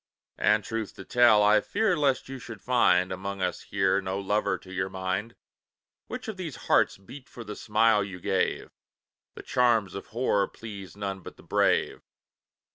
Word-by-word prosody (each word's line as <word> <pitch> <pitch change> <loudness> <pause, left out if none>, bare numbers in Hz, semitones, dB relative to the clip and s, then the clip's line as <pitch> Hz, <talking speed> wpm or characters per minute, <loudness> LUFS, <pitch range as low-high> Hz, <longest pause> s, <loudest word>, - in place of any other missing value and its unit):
And 105 0 +3
truth 115 -2 -4
to 95 - -10
tell, 120 -4 +5
I 105 +1 +5
fear 220 -5 +1
lest 140 -4 +1
you 135 0 -7
should 115 -3 -9
find, 95 -7 +3
Among 100 +1 -4
us 90 -2 -2
here, 100 - +1
no 95 0 -3
lover 100 -1 0
to 95 0 -13
your 95 0 -1
mind; 95 +4 -3 0.7
Which - - -6
of 220 -3 -5
these 170 -7 -5
hearts - - +3
beat 125 +8 -13
for 120 - -9
the 105 -1 -7
smile 110 -1 +3
you 95 -2 -7
gave? - - -1 0.6
The - - -9
charms 115 -6 +2
of 100 - -7
horror 110 -4 +1
please 100 -5 -10
none 100 -1 -4
but 95 - -11
the - - -16
brave. - - +1
105 Hz, 175 wpm, -27 LUFS, 95-120 Hz, 0.7 s, tell